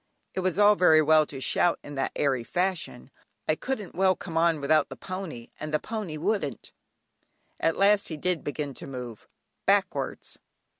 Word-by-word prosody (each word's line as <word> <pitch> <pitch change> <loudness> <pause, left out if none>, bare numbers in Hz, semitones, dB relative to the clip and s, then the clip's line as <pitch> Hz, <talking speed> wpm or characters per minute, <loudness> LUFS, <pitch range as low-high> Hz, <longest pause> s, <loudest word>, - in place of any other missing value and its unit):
It - - -2
was 185 -1 0
all 205 0 +7
very 180 -5 +5
well 155 0 +5
to 135 - -6
shout 170 +5 +2
in 145 - -9
that 135 -1 -1
airy 135 -4 +1
fashion, 175 -5 -2 0.4
I - - +3
couldn't 215 +2 -4
well 190 0 +3
"come 165 - -8
on" 165 -1 +3
without 150 +1 +2
the 135 - -7
pony, 160 -5 -7
and 155 0 -5
the 155 - +3
pony 210 -5 -5
wouldn't. 185 -3 -2 0.9
At 165 - +1
last 200 +1 +4
he 160 - -5
did 180 0 -1
begin 145 -1 -4
to - - -8
move, 125 -4 -8 0.4
backwards! - - 0
160 Hz, 170 wpm, -27 LUFS, 145-185 Hz, 0.9 s, all